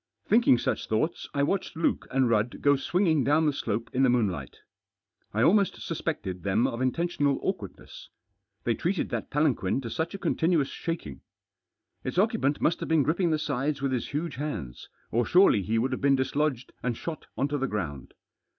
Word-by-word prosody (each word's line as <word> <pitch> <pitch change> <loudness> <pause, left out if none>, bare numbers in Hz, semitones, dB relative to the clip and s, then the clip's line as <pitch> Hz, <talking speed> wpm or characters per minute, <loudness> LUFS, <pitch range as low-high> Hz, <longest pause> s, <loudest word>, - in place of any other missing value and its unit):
Thinking 220 - +5
such - - -2
thoughts 135 +10 -1
I 140 - 0
watched 175 +1 -1
Luke 165 - 0
and 130 -1 +2
Rudd 115 0 +1
go 145 0 +4
swinging 160 +1 +1
down 150 +5 +3
the 150 - +2
slope 115 -3 -2
in 130 - +1
the 135 - +5
moohlight. 100 - -1 0.7
I 110 +2 +1
almost 200 +5 +3
suspected 145 - -4
them 100 +5 +1
of 115 - -2
intentioiial 145 +1 +1
awkwardness; 190 -2 -5 0.5
they 120 - +1
treated 175 - -1
that - - -3
palanquin 140 -8 +1
to 115 -3 -6
such 160 - -2
a - - -3
continuous 165 -6 +1
shaking. 165 - -5 0.8
Its 130 - -4
occupant 200 - +2
must 165 - +1
have - - -5
been 160 -3 +4
gripping 170 +5 +1
the 155 - +2
sides 145 -1 -2
with 135 - +1
his 125 -3 -1
huge 150 0 -3
hands, 135 - -5 0.2
or 120 +2 +2
surely 175 - +5
he 110 +5 -1
would 125 +4 +1
have 130 - -3
been 140 0 +4
dislodged 135 -1 -1
and 125 -2 -2
shot 165 -3 -6
on 140 - +1
to 145 0 -1
the 135 - 0
ground. 80 - -5
140 Hz, 185 wpm, -27 LUFS, 120-160 Hz, 0.8 s, Thinking